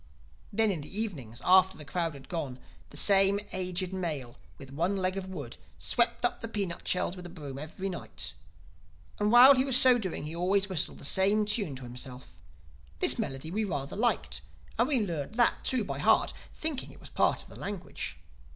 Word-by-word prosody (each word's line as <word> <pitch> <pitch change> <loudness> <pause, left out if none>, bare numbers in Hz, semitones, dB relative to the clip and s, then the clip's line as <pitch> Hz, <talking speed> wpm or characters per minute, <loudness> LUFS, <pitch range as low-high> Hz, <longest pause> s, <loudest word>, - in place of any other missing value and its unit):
"Then 220 0 +2
in 170 -6 -3
the 190 +8 -6
evenings, 135 - -2
after 190 +1 +5
the 150 - -9
crowd 165 +1 -2
had 135 -1 -12
gone, 150 -8 -4 0.3
the 145 - -10
same 195 +2 +5
aged 185 0 -2
male 150 -10 -4 0.2
with 135 -2 -11
one 175 +7 0
leg 185 0 0
of 195 -1 -4
wood, 145 -10 -7 0.2
swept 240 0 +1
up - - -1
the 230 - -3
peanut 200 -6 -3
shells 180 0 +1
with 180 -1 -8
a - - -10
broom 145 -6 -8
every 160 +6 -5
night. 180 -3 -3 0.9
And 210 0 +2
while 250 +3 +10
he 260 -1 +3
was 265 -2 +2
so 255 -1 +6
doing 190 -9 -4
he 155 +2 -5
always 190 +3 +2
whistled 185 -6 -1
the - - -8
same 200 +6 +4
tune 200 - +1
to 130 - -8
himself. 125 -4 -8 0.6
This - - +3
melody 135 +4 -3
we 215 +4 0
rather 145 -9 -3
liked; 240 +3 0 0.4
and 235 - +4
we 260 -7 +2
learned 165 +1 -4
that 240 0 +3
too 255 -4 +1
by - - -4
heart—thinking 310 -4 0
it - - -15
was - - -11
part - - +1
of - - -18
the - - -13
language. 195 - -5
185 Hz, 195 wpm, -29 LUFS, 150-210 Hz, 0.9 s, while